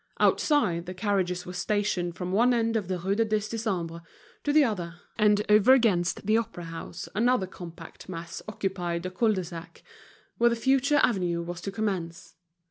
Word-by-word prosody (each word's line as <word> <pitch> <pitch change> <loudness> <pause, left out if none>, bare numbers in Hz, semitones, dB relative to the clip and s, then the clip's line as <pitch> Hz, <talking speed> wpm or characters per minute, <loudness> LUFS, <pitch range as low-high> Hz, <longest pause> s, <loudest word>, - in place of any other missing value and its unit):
Outside, 185 - +2
the 185 - -6
carriages 185 -2 -1
were 180 - -7
stationed 180 -2 -1
from 180 0 -4
one 240 +5 +4
end 230 -1 +1
of 210 -5 -1
the 185 -1 -1
Rue 190 +3 -1
du 225 +3 +2
Dix 215 -1 -1
Décembre 185 -7 -3 0.4
to 290 - +1
the 305 0 +6
other, 180 -9 -2 0.2
and 210 0 +4
over 210 +4 +6
against 195 -11 +2
the 215 +2 +3
Opera 220 -6 -3
house 165 +1 -7
another 235 -1 +2
compact 170 -2 -11
mass 170 -1 -6
occupied 180 -5 -3
the 185 - -4
cul 220 +3 +2
de 190 -2 -2
sac, 170 -1 -10 0.6
where 235 0 +5
the 235 - 0
future 270 +4 +3
avenue 175 -6 +1
was 175 0 -6
to 195 - -4
commence. 190 -5 -3
195 Hz, 180 wpm, -27 LUFS, 175-220 Hz, 0.6 s, the